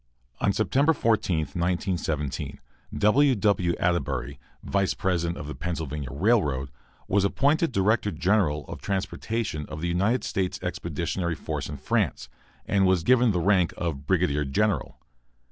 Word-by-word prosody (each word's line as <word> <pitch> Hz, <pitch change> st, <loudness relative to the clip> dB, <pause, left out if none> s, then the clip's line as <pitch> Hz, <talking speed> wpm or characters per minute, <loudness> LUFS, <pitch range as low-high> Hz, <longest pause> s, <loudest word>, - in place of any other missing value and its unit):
On 100 Hz, -, +2 dB
September 130 Hz, -, +2 dB
14, 110 Hz, -, +1 dB
1917, 85 Hz, -5 st, -2 dB, 0.4 s
W. 130 Hz, +6 st, +4 dB
W. 100 Hz, -4 st, +1 dB
Atterbury, 70 Hz, -7 st, -1 dB, 0.2 s
vice 95 Hz, -1 st, 0 dB
president 85 Hz, -2 st, -1 dB
of -, -, -6 dB
the 75 Hz, -, -5 dB
Pennsylvania 75 Hz, -5 st, -4 dB
Railroad, 70 Hz, -, +1 dB, 0.4 s
was 100 Hz, 0 st, +2 dB
appointed 145 Hz, -, +2 dB
director 105 Hz, 0 st, +2 dB
general 85 Hz, -4 st, +1 dB
of -, -, -8 dB
transportation 100 Hz, -3 st, -3 dB
of 75 Hz, -, -7 dB
the 85 Hz, -, -2 dB
United 100 Hz, +9 st, +1 dB
States 95 Hz, -2 st, -1 dB
Expeditionary 85 Hz, 0 st, -2 dB
Force -, -, -4 dB
in -, -, -5 dB
France, -, -, -1 dB, 0.4 s
and 95 Hz, -1 st, +2 dB
was 95 Hz, -3 st, +2 dB
given 125 Hz, +3 st, +4 dB
the 90 Hz, -4 st, +1 dB
rank 90 Hz, -3 st, +2 dB
of 75 Hz, -5 st, -4 dB
brigadier 85 Hz, -6 st, +2 dB
general. 100 Hz, +10 st, 0 dB
90 Hz, 135 wpm, -26 LUFS, 80-105 Hz, 0.4 s, W